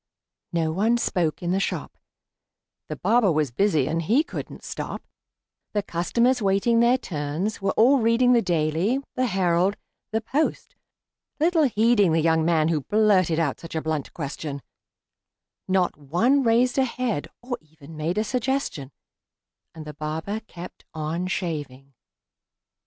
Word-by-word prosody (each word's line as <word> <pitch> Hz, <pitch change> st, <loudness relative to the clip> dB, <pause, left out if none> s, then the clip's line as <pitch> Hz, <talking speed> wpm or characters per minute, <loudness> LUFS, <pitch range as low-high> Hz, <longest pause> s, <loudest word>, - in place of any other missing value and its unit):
No 165 Hz, -2 st, 0 dB
one 215 Hz, +8 st, +2 dB
spoke 175 Hz, -8 st, -1 dB
in 175 Hz, -, -1 dB
the 190 Hz, -, +1 dB
shop: -, -, -3 dB, 0.9 s
The -, -, -4 dB
barber 230 Hz, -5 st, +3 dB
was 150 Hz, -4 st, 0 dB
busy, 155 Hz, -, +2 dB
and 165 Hz, +1 st, -1 dB
he 230 Hz, -, +3 dB
couldn't 330 Hz, -, -8 dB
stop; -, -, -6 dB, 0.7 s
The 205 Hz, -1 st, 0 dB
customers, 235 Hz, +8 st, +1 dB
waiting 200 Hz, +4 st, +2 dB
their 240 Hz, +2 st, +4 dB
turns, 170 Hz, -, -3 dB
were 195 Hz, -, 0 dB
all 260 Hz, +5 st, +5 dB
reading 235 Hz, +2 st, +4 dB
The 235 Hz, -, +4 dB
"Daily," 170 Hz, -, +1 dB, 0.2 s
the 255 Hz, 0 st, 0 dB
"Herald," 185 Hz, 0 st, +1 dB, 0.3 s
the 220 Hz, -, +1 dB
"Post," 280 Hz, +7 st, -2 dB, 0.6 s
little 325 Hz, 0 st, +3 dB
heeding 220 Hz, -, +3 dB
The 165 Hz, -, +3 dB
young 160 Hz, 0 st, +2 dB
man 160 Hz, -1 st, +2 dB
who 155 Hz, -3 st, 0 dB
blurted 195 Hz, -3 st, +2 dB
out 160 Hz, -5 st, 0 dB
such 165 Hz, -1 st, -9 dB
a 160 Hz, -, 0 dB
blunt 155 Hz, -3 st, -2 dB
question; 140 Hz, -2 st, -6 dB, 1.0 s
Not 185 Hz, -1 st, +1 dB
one 180 Hz, -, +2 dB
raised 245 Hz, +2 st, +2 dB
a -, -, +5 dB
head, 240 Hz, -, -2 dB, 0.2 s
or 245 Hz, -1 st, -4 dB
even 155 Hz, 0 st, -15 dB
made 160 Hz, +4 st, -2 dB
a 215 Hz, -, +2 dB
suggestion; 250 Hz, -, -2 dB, 0.9 s
And 155 Hz, -1 st, -9 dB
the 150 Hz, -, -7 dB
barber 160 Hz, +8 st, -4 dB
kept 175 Hz, +1 st, -10 dB
on 160 Hz, +3 st, -2 dB
shaving. 145 Hz, -8 st, -4 dB
185 Hz, 145 wpm, -24 LUFS, 160-230 Hz, 1.0 s, all